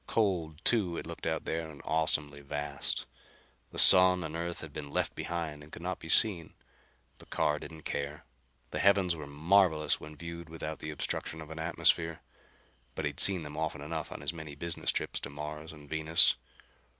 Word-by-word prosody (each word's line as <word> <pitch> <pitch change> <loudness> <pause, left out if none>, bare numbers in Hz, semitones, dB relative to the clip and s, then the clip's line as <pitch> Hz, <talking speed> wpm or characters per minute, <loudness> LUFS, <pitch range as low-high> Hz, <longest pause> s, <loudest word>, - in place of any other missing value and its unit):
Cold, 90 -7 -1
too, 95 -8 +3
it - - -5
looked - - -6
out - - -2
there, 80 0 -3
and 75 -2 -12
awesomely 75 -2 0
vast. 70 0 -3 0.6
The - - -11
sun 90 -1 +9
and 80 0 -6
Earth 85 +1 -4
had 80 -3 -9
been 70 - -6
left - - -1
behind 80 -3 -4
and 75 +1 -14
could - - -9
not 90 0 -3
be 80 - -10
seen. 90 -6 +4 0.6
But - - -16
Carr 75 0 0
didn't 80 -1 -10
care. 70 +1 -4 0.5
The - - -3
heavens 95 -3 +3
were 75 -3 -8
marvelous 80 +1 +2
when 75 0 -10
viewed 85 +1 -8
without 80 -1 -6
the 75 - -6
obstruction 75 +2 -3
of 80 0 -9
an 80 - -7
atmosphere. 80 0 +1 0.7
But 80 - -3
he'd 75 -1 -3
seen 95 -4 +6
them 75 -1 -8
often 80 -2 -3
enough 80 +1 -5
on - - -7
his 75 +3 -3
many 80 -3 -8
business 85 +3 -2
trips - - -2
to - - -6
Mars 75 +2 -7
and 75 -2 -14
Venus. 80 +2 +3
80 Hz, 185 wpm, -31 LUFS, 75-85 Hz, 0.7 s, sun